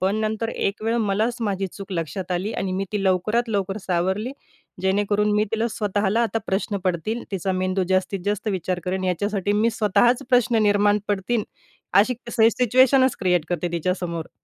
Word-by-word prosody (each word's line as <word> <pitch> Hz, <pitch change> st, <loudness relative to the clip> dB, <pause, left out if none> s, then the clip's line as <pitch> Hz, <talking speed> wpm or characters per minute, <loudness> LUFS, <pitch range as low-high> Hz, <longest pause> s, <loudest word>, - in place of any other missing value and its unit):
पण 195 Hz, +3 st, +1 dB
नंतर 220 Hz, +1 st, -1 dB
एक 205 Hz, -1 st, -2 dB
वेळ 225 Hz, +1 st, 0 dB
मलाच 220 Hz, +2 st, 0 dB
माझी 195 Hz, -3 st, -1 dB
चूक 195 Hz, +1 st, -9 dB
लक्षात 170 Hz, +2 st, -4 dB
आली 190 Hz, +5 st, -2 dB
आणि 190 Hz, -1 st, -2 dB
मी 195 Hz, +1 st, -1 dB
ती 205 Hz, -2 st, -1 dB
लवकरात 215 Hz, +6 st, +1 dB
लवकर 195 Hz, -2 st, -1 dB
सावरली 190 Hz, +7 st, 0 dB, 0.5 s
जेणेकरून 205 Hz, +2 st, +1 dB
मी 210 Hz, -, +3 dB
तिला 225 Hz, +1 st, +1 dB
स्वतःला 210 Hz, 0 st, 0 dB
आता 225 Hz, -1 st, 0 dB
प्रश्न 200 Hz, +1 st, -1 dB
पडतील. 185 Hz, +6 st, -1 dB
तिचा 190 Hz, 0 st, -1 dB
मेंदू 185 Hz, 0 st, 0 dB
जास्तीत 185 Hz, 0 st, +1 dB
जास्त 210 Hz, +1 st, -1 dB
विचार 185 Hz, -2 st, -2 dB
करेन. 185 Hz, +1 st, -2 dB
याच्यासाठी 205 Hz, +2 st, 0 dB
मी 220 Hz, +3 st, +2 dB
स्वतःच 235 Hz, +4 st, +2 dB
प्रश्न 245 Hz, -2 st, +3 dB
निर्माण 205 Hz, 0 st, +3 dB
पडतील 205 Hz, +3 st, 0 dB, 0.6 s
अशी 250 Hz, +5 st, +1 dB, 0.2 s
से 225 Hz, -1 st, +4 dB
सिच्युएशनच 255 Hz, +2 st, +4 dB
क्रिएट 180 Hz, -4 st, +2 dB
करते 175 Hz, 0 st, -1 dB
तिच्यासमोर. 170 Hz, -1 st, -2 dB
205 Hz, 165 wpm, -23 LUFS, 185-220 Hz, 0.6 s, से